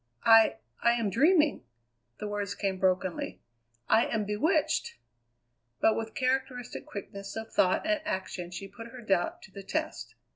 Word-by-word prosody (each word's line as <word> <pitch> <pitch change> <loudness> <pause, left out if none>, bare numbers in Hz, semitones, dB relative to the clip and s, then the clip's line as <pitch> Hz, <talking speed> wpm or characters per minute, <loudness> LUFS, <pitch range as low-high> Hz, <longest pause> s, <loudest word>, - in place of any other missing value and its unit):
"I 225 - +7 0.3
I 235 - +4
am 230 -4 0
dreaming!" 300 - +4 0.5
The 210 - -5
words 205 -1 -3
came 195 -2 -2
brokenly. 185 -1 0 0.5
"I 225 +1 +4
am 215 -2 -1
bewitched!" 295 +9 +1 0.8
But 220 - +4
with 225 0 -4
characteristic 255 -1 -2
quickness 200 0 -7
of 225 0 -6
thought 185 +9 +3
and 315 -1 +1
action 190 - -3
she 180 +2 -7
put 230 +4 -10
her 245 +1 -10
doubt 195 -5 0
to - - -14
the 200 - -8
test. 195 - -4
220 Hz, 150 wpm, -29 LUFS, 195-250 Hz, 0.8 s, I